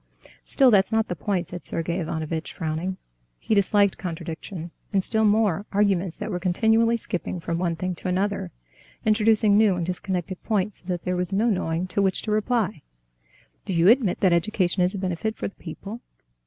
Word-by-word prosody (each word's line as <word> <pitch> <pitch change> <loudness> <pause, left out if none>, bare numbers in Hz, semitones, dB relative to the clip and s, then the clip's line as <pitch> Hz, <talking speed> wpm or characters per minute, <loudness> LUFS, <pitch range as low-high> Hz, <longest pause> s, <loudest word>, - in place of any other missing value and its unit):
"Still, 265 -2 +4
that's 200 0 +4
not 225 0 +1
the 180 - -2
point," 185 0 -2
said 180 0 -7
Sergey 170 +2 -2
Ivanovitch, 160 -1 -3
frowning. 165 +4 -3 0.4
He - - -2
disliked 200 -1 +3
contradiction, 165 0 -6 0.2
and 195 -2 +2
still 220 +2 +2
more, 205 -2 +2
arguments 195 -4 +1
that - - -4
were 180 - -2
continually 220 +6 +3
skipping 180 -4 -4
from 165 0 -3
one 175 -2 0
thing 185 +2 -3
to - - -6
another, 190 - -1 0.6
introducing 215 -1 +4
new 210 -4 +4
and 175 -1 -2
disconnected 180 0 -3
points, 210 -2 -1
so 175 - -11
that 180 -2 -2
there 180 - -1
was 180 +1 -2
no 220 +4 +2
knowing 170 -2 -1
to 185 +2 -1
which 190 -1 +1
to 215 - -3
reply. 215 - 0 0.8
"Do 190 - -4
you 170 +2 +5
admit 230 -6 +3
that 185 -3 +4
education 180 0 +1
is 180 +3 +2
a - - -2
benefit 190 +3 -2
for - - -3
the 200 - -10
people?" 200 +7 -8
190 Hz, 185 wpm, -25 LUFS, 175-210 Hz, 0.8 s, you